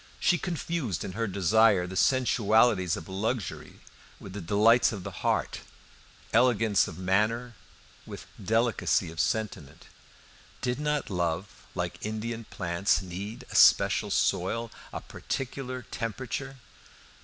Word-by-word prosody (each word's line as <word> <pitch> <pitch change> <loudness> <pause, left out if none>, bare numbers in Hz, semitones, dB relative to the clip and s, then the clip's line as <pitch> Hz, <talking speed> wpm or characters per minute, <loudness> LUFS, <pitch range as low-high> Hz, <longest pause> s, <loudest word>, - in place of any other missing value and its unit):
She 175 - +3
confused 165 - -3
in - - -5
her 115 +4 -2
desire 100 0 +3
the 90 +1 -7
sensualities 110 -6 +3
of 80 - -9
luxury 105 +2 -4 0.4
with 95 - -10
the 105 - -5
delights 105 +7 +4
of 100 -5 -6
the - - -6
heart, - - 0 0.7
elegance 115 -4 +3
of 80 - -8
manners 110 +6 0 0.5
with - - -8 0.2
delicacy 115 -4 +1
of 80 - -10
sentiment. 105 -10 -2 0.7
Did 125 +1 -2
not 150 -5 -1
love, 85 +1 -3
like - - -3
Indian 115 +2 -4
plants, 85 +2 0
need 95 +5 -7
a - - -7
special - - +5
soil, 115 +6 0 0.2
a - - -5
particular 130 -1 -5
temperature? 130 +4 -4
110 Hz, 120 wpm, -28 LUFS, 95-120 Hz, 0.7 s, special